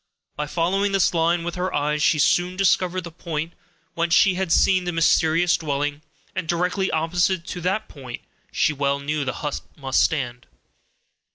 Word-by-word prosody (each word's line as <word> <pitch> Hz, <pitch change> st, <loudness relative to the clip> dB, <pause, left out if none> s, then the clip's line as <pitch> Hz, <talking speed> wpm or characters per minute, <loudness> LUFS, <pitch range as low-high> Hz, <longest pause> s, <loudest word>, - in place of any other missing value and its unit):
By 150 Hz, 0 st, -3 dB
following 195 Hz, +6 st, 0 dB
this 195 Hz, -2 st, +3 dB
line 170 Hz, +1 st, +1 dB
with 175 Hz, 0 st, -3 dB
her 180 Hz, +1 st, -2 dB
eyes, 150 Hz, +1 st, 0 dB
she 155 Hz, -, +3 dB
soon 175 Hz, +5 st, +2 dB
discovered 185 Hz, -1 st, +1 dB
the 170 Hz, -1 st, -9 dB
point 165 Hz, 0 st, -5 dB, 0.4 s
whence 170 Hz, 0 st, +1 dB
she 195 Hz, -, +5 dB
had 185 Hz, -2 st, -2 dB
seen 185 Hz, +1 st, +3 dB
the 175 Hz, -, -1 dB
mysterious 165 Hz, +1 st, +3 dB
dwelling, 145 Hz, -1 st, -2 dB, 0.3 s
and 185 Hz, -2 st, -3 dB
directly 180 Hz, +3 st, 0 dB
opposite 170 Hz, +2 st, 0 dB
to 175 Hz, -, -6 dB
that 195 Hz, +5 st, -1 dB
point 130 Hz, -4 st, -9 dB, 0.3 s
she 150 Hz, -, +1 dB
well 140 Hz, 0 st, 0 dB
knew 150 Hz, +1 st, -2 dB
the 130 Hz, -, -2 dB
hut 145 Hz, -, -2 dB, 0.2 s
must 135 Hz, -2 st, +1 dB
stand. 125 Hz, -6 st, -1 dB
165 Hz, 170 wpm, -23 LUFS, 150-180 Hz, 0.4 s, she